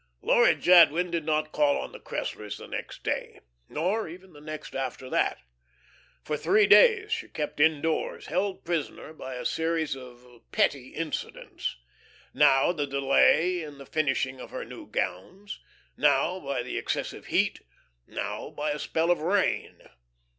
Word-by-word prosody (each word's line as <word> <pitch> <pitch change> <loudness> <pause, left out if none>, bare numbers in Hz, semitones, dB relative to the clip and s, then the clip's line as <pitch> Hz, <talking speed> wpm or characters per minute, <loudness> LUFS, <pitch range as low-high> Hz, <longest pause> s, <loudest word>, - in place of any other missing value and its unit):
Laura - - +5
Jadwin 175 0 +5
did 165 -3 -2
not 155 0 0
call 145 -1 +2
on - - -5
the - - -10
Cresslers 105 -1 -5
the - - -10
next - - -7
day, - - -3 0.3
nor 185 +8 -1
even 180 +2 -12
the 145 - -14
next 155 0 -8
after 130 -1 -4
that. - - +1 0.9
For 150 - -2
three 410 - +3
days 435 -3 +6
she 460 0 -2
kept 150 -1 -5
indoors, 160 +1 +1
held 190 +4 -2
prisoner 165 -2 -3
by 130 -4 -7
a 125 - -6
series 160 -3 0
of 125 -2 -12 0.3
petty 135 -3 +1
incidents; 160 - -4 0.6
now 135 +5 +5
the 150 -5 -2
delay 140 +6 +3
in 150 -3 -8
the 140 - -11
finishing 135 -4 -1
of - - -9
her - - -6
new - - -10
gowns, 190 - -4 0.4
now 185 +1 +2
by 140 -6 -3
the 125 - -3
excessive - - -4
heat, - - +1 0.5
now - - -5
by 150 0 -3
a 150 - -3
spell 165 +3 0
of 175 - +2
rain. 185 +5 0
155 Hz, 155 wpm, -27 LUFS, 140-180 Hz, 0.9 s, days